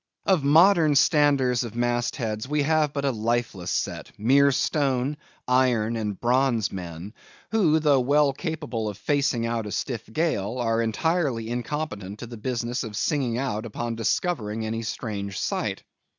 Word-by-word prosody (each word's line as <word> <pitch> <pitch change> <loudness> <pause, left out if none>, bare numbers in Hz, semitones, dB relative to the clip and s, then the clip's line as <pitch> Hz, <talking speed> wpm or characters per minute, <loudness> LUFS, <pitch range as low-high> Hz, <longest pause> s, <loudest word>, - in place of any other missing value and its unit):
Of 185 -7 +3
modern 160 +1 +5
standers 140 -5 +3
of 115 -2 -7
mast 120 0 0
heads 110 -3 -3
we 150 +1 +1
have 155 0 +2
but 140 -1 -3
a 135 - +2
lifeless 115 -5 -2
set; - - -3
mere 140 +6 +4
stone, 135 0 0 0.3
iron, 125 -3 +2
and 105 -3 -3
bronze 120 -3 +2
men; 90 +2 -7 0.4
who, 180 -9 +3
though 145 -3 +4
well 140 +2 +3
capable 145 - -3
of 100 - -7
facing 140 -2 0
out 115 -2 -2
a - - -6
stiff 115 -1 -4
gale, 125 - -1
are 115 -2 0
still 115 - +1
entirely 125 -2 0
incompetent 120 -6 -4
to 120 - -7
the 120 0 -9
business 120 +2 -2
of 110 -3 -6
singing 130 -3 0
out 120 -5 -2
upon 115 +1 -4
discovering 110 - -1
any 115 +1 -3
strange 100 -3 -4
sight. - - -2
120 Hz, 160 wpm, -25 LUFS, 110-145 Hz, 0.4 s, modern